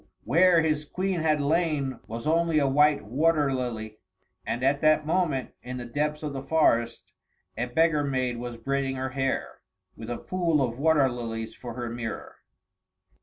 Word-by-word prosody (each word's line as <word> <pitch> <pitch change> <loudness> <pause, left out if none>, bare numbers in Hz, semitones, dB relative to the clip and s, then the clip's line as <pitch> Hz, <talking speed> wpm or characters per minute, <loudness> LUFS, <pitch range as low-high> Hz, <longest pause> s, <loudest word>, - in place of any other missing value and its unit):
where 170 +6 +5
his 155 -1 0
Queen 185 +3 -2
had 155 -1 +2
lain 145 -4 0
was 115 +1 -6
only 165 0 +2
a 140 -2 +3
white 145 -1 +3
water 145 +4 +2
lily. 110 -4 -4 0.5
And 120 - -2
at 140 +2 +2
that 155 0 +4
moment, 155 -6 0
in 125 +1 -6
the 120 - -6
depths 150 +5 -2
of 150 -2 -3
the 135 - -4
forest, 120 -6 +1 0.4
a 120 +3 -2
beggar 155 +3 +2
maid 130 -3 -1
was 120 0 -6
braiding 135 +2 -1
her 130 0 -3
hair, 135 0 -2 0.3
with 110 0 -9
a 120 - -3
pool 170 -4 0
of 125 -2 -1
water 150 -2 +4
lilies 115 -2 -5
for 120 -1 -8
her 120 -1 -4
mirror. 115 -1 -6
135 Hz, 170 wpm, -27 LUFS, 120-155 Hz, 0.5 s, where